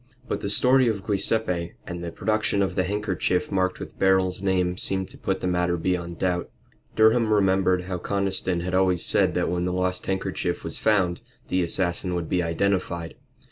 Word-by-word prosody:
But - - -2
the 100 - -2
story 130 +4 +4
of 105 -4 -1
Guiseppe, 95 -4 0
and 85 0 -6
the 85 - -4
production 110 -1 0
of 95 -2 -1
the 95 0 0
handkerchief 95 -3 -1
marked 95 -1 0
with - - -9
Beryl's 95 -1 +2
name 90 -2 +1
seemed 95 +1 -3
to - - -14
put - - -2
the - - -1
matter 90 -1 +1
beyond 85 -1 -2
doubt. 90 -1 -1 0.5
Durham 110 0 +4
remembered 95 -3 +3
how 90 -1 -4
Conniston 95 -2 -1
had 90 +1 -4
always 95 -2 +2
said - - +2
that - - +1
when 90 +1 -1
the 90 - -1
lost 90 0 -1
handkerchief 95 -2 -2
was - - -3
found 95 -5 +2 0.3
the 90 - +1
assassin 90 +1 0
would 85 -2 -3
be 90 - +1
identified. 85 -1 -1
95 Hz, 180 wpm, -25 LUFS, 90-100 Hz, 0.5 s, story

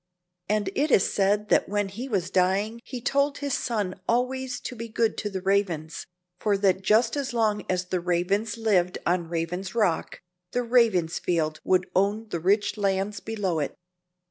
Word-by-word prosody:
And 205 -2 0
it 295 +3 +1
is 200 - +3
said 205 +1 +1
that - - +3
when 205 0 0
he 235 +8 -6
was 190 -6 -1
dying 195 +5 +1
he 250 -2 -7
told 280 +3 +1
his 285 -2 -3
son 205 -8 -2
always 250 +1 0
to 250 - -6
be 230 0 -6
good 225 0 +1
to 210 - -2
the 190 -2 -5
Ravens, 185 -5 -1 0.3
for 205 -2 +1
that 195 -1 +2
just 225 +5 +3
as 275 -3 -2
long 215 -2 +1
as 185 0 0
the 185 0 -1
Ravens 180 +6 0
lived 190 -6 +2
on 175 -1 0
Raven's 175 +4 -3
Rock, 205 -8 0 0.3
the 245 - +1
Ravensfields 180 -9 +1
would 185 -1 +2
own 205 +4 +1
the 170 - -2
rich 205 +5 +1
lands 200 0 0
below 200 -7 -2
it. 145 - -3
205 Hz, 170 wpm, -26 LUFS, 185-225 Hz, 0.3 s, is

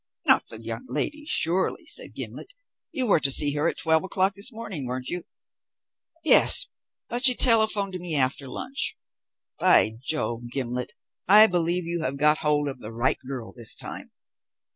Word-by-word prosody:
"Not - - +3
the 110 - -10
young 115 +2 -7
lady, 295 - -2
surely," 175 - 0
said - - -5
Gimblet; - - -7 0.4
"you 265 -6 -1
were 200 -7 +3
to 140 - 0
see 145 +1 +5
her 150 +2 -1
at - - -3
twelve 160 0 +1
o'clock 190 +1 -1
this 200 +6 -3
morning, 210 - -6
weren't 125 +1 -5
you?" 175 -1 -5 1.0
"Yes, 320 - +5 0.4
but 245 +1 -4
she 255 -2 +9
telephoned 220 -5 +3
to 180 - -5
me 175 -3 -2
after 135 0 0
lunch. 255 - -4 0.6
By 110 - +4
Jove, 120 -5 -3
Gimblet, 125 -1 -4 0.3
I 210 +3 +8
believe 175 -2 -1
you 170 0 -2
have 135 -1 -3
got 150 +2 +2
hold 150 -1 0
of 135 -2 -6
the 110 -2 -8
right 120 +3 -1
girl 130 -4 -7
this 120 -3 +1
time." - - -7
160 Hz, 170 wpm, -24 LUFS, 130-200 Hz, 1.0 s, she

